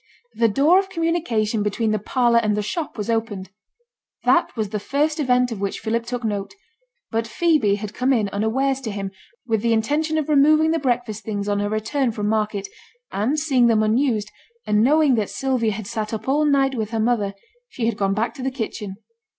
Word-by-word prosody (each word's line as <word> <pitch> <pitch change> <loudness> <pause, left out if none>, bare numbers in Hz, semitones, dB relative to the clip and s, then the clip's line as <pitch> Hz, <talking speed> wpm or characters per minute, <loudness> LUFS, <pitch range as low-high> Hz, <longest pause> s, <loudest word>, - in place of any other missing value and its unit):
The 230 - +3
door 290 - +4
of 390 0 -3
communication 320 - 0
between 215 +2 0
the 215 - 0
parlour 235 +2 +2
and 215 -2 0
the 210 - 0
shop 295 - -4
was 210 - -3
opened. 220 -5 -2 0.7
That - - +3
was 215 -3 -2
the 210 0 -3
first 300 +8 0
event 250 -3 +2
of 210 -4 -5
which 200 -1 -2
Philip 230 +1 -2
took 245 0 -4
note; 205 - -3 0.6
but 225 0 -1
Phoebe 305 - +2
had 205 0 -6
come 255 +2 +1
in 225 -6 +2
unawares 260 +7 0
to 240 - -4
him, 200 -1 -4 0.3
with 225 -3 0
the 230 0 +2
intention 300 +8 0
of 310 - -1
removing 305 +2 +4
the 330 - +1
breakfast 240 -5 -1
things 205 -1 -3
on 205 0 0
her 205 0 -1
return 230 +5 0
from 210 -1 -3
market, 210 -2 -1 0.4
and 255 +10 0
seeing 265 -6 +3
them 220 -2 +3
unused, 215 -2 +1 0.3
and 210 0 +2
knowing 295 +1 +4
that 205 - -4
Sylvia 255 -5 0
had 215 0 -6
sate 220 0 -3
up 220 +2 -8
all 295 +3 +2
night 275 -2 +3
with 220 -4 -3
her 225 -1 -2
mother, 215 -3 0 0.3
she 240 - -3
had 230 - 0
gone 195 -1 0
back 225 +2 -1
to 260 - -9
the 265 - 0
kitchen. 220 -5 -5
230 Hz, 205 wpm, -22 LUFS, 210-270 Hz, 0.7 s, door